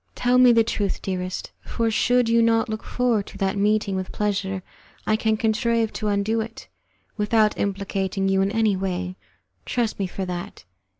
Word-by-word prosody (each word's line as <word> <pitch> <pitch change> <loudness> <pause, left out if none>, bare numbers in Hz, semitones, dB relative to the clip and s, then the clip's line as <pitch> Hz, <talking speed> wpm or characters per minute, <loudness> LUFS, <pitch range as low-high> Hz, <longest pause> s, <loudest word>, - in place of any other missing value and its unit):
Tell 250 +1 +3
me 250 -1 +7
the 230 -1 +5
truth, 205 -3 -2
dearest, 185 -1 -4
for, 230 -1 -1
should 245 +2 +2
you 230 0 +4
not 230 +1 +2
look 220 0 -3
forward 240 -5 0
to - - -11
that 195 -1 0
meeting 205 -1 +1
with 185 0 -4
pleasure, 195 -2 -2 0.4
I 215 - +2
can 220 0 +1
contrive 225 0 +1
to 215 - -3
undo 205 +2 +1
it 225 +1 -8 0.5
without 215 0 +2
implicating 195 -1 -1
you 195 0 +2
in 195 - +2
any 220 -1 +2
way; 185 -1 -3 0.5
trust 235 -4 -1
me 195 - 0
for 190 +1 -4
that. 175 - -6
210 Hz, 175 wpm, -23 LUFS, 195-225 Hz, 0.5 s, me